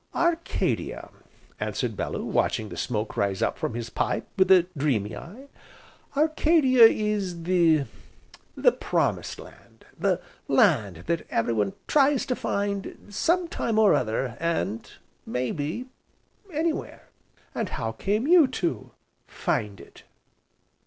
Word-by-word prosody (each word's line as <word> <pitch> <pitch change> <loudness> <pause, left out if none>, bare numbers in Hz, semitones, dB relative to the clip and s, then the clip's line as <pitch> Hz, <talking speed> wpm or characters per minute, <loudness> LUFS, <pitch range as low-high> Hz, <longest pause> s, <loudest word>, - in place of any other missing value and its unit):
"Arcadia," 340 0 -1 0.5
answered - - -2
Bellew, - - -3
watching 110 -2 0
the - - -8
smoke 110 -2 -3
rise 100 -1 0
up - - -1
from - - -2
his 120 -1 -5
pipe, - - -1
with 190 -1 +3
a 185 -2 +7
dreamy 130 -8 0
eye, 230 +11 -10 0.7
"Arcadia 305 -5 +5
is 205 -6 +1
the 170 -4 +3 1.0
Promised - - -1
Land, - - -15
the - - +1 0.3
Land 110 - +2
that 170 -1 -2
everyone 110 -3 0
tries 285 -2 +3
to 250 - -1
find, 200 -1 -3
sometime 330 - 0
or 215 -2 +6
other, 115 +1 -1
and 115 - -2 0.3
may 125 0 -2
be 155 - -3 0.7
anywhere." 320 +1 -3 0.4
"And 220 -5 -2
how 110 0 -3
came 205 - -1
you 335 -2 +6
to 170 - -3 0.4
find 100 -2 -2
it?" - - -15
180 Hz, 120 wpm, -26 LUFS, -, 1.0 s, a